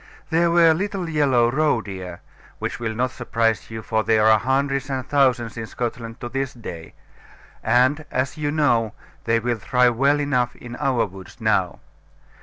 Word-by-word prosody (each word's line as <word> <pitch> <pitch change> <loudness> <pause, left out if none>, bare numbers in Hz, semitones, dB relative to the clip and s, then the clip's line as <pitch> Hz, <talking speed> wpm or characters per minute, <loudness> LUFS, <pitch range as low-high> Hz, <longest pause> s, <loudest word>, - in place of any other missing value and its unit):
There 170 +1 +3
were 170 -1 +5
little 190 +1 -3
yellow 135 -7 +2
roe 150 -2 +2
deer, 95 -4 -8 0.4
which - - -4
will 110 -2 -3
not 125 +2 0
surprise 115 -3 -1
you, 110 -1 -7
for 110 0 0
there 110 0 +3
are 110 -1 +6
hundreds 135 +2 0
and 130 -1 -3
thousands 125 -5 +1
in 110 -1 -5
Scotland 115 0 -5
to 120 - -4
this 135 +1 -3
day; 85 -8 -9 0.7
and, 130 +5 +3
as 130 +3 -1
you 150 -2 -2
know, 120 -8 +1 0.3
they 115 0 +2
will 120 0 -2
thrive 125 +1 +2
well 140 +4 +3
enough 125 -4 0
in 120 0 -9
our 135 -6 +1
woods 95 -2 -12
now. - - 0
125 Hz, 170 wpm, -22 LUFS, 115-140 Hz, 0.7 s, are